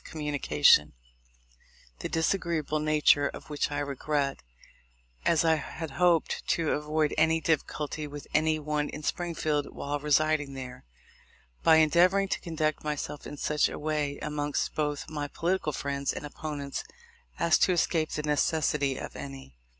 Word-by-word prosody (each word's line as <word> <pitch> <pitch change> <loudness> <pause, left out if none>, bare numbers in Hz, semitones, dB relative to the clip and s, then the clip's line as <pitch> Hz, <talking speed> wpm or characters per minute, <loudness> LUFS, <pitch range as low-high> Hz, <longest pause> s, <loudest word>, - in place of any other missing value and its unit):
249 150 -2 -5
communication, 75 0 +5 1.1
the - - -4
disagreeable 160 -2 0
nature 150 -1 +4
of 150 - -9
which 145 - 0
I 145 - -3
regret, 140 0 -1 0.9
as 165 -1 +3
I 160 -1 +4
had 160 0 -6
hoped 170 +3 +2
to 165 -3 +1
avoid 150 0 0
any 160 +1 +4
difficulty 155 -1 -1
with 145 0 -8
any 155 0 +3
one 150 -1 -2
in 150 - -7
Springfield 155 -3 -1
while 145 +1 -3
residing 150 -1 +1
there, 125 - -8 0.8
by 160 - +6
endeavoring 175 +5 +4
to - - -1
conduct 155 -3 -1
myself 150 -1 -4
in 145 - -8
such 150 +1 +1
a - - -6
way 150 -2 -1
amongst 145 -1 -2
both 150 -2 -2
my 150 -2 -4
political 170 +1 -1
friends 140 0 -2
and - - -6
opponents, 145 -1 -5 0.5
as 170 -1 +3
to - - +4
escape 165 -2 +1
the 150 - -3
necessity 150 -2 +1
of - - -7
any. 65 -2 -9
150 Hz, 145 wpm, -28 LUFS, 145-160 Hz, 1.1 s, by